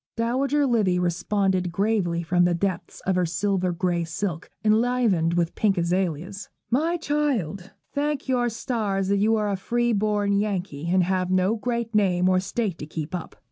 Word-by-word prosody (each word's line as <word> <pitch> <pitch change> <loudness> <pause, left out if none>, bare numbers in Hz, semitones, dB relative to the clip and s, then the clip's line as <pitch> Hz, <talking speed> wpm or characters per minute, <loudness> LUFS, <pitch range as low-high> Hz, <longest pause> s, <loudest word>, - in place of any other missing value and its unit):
Dowager 270 +5 +1
Livy 215 -8 +2
responded 180 +1 0
gravely 185 -3 0
from 175 +1 +2
the 175 -1 +3
depths 180 -1 -3
of 190 - 0
her 180 -1 +2
silver 185 +1 0
grey 175 -1 0
silk, 165 +1 -4 0.2
enlivened 215 -7 +2
with 170 -1 0
pink 200 -3 +1
azaleas, 180 +2 -1 0.2
'My 320 +8 +2
child, 260 - -1 0.2
thank 290 -1 -1
your 245 -2 +1
stars 210 -4 -2
that 200 - +3
you 215 +3 +3
are 210 -1 0
a - - 0
free 240 +5 0
born 205 -1 +1
Yankee, 185 -7 -3
and 185 +1 +3
have 185 0 0
no 185 +3 +2
great 235 0 -3
name 185 -4 +3
or 185 0 +3
state 195 -1 -2
to 150 - -6
keep 155 +1 -5
up. 175 -2 -5
195 Hz, 170 wpm, -25 LUFS, 180-225 Hz, 0.2 s, the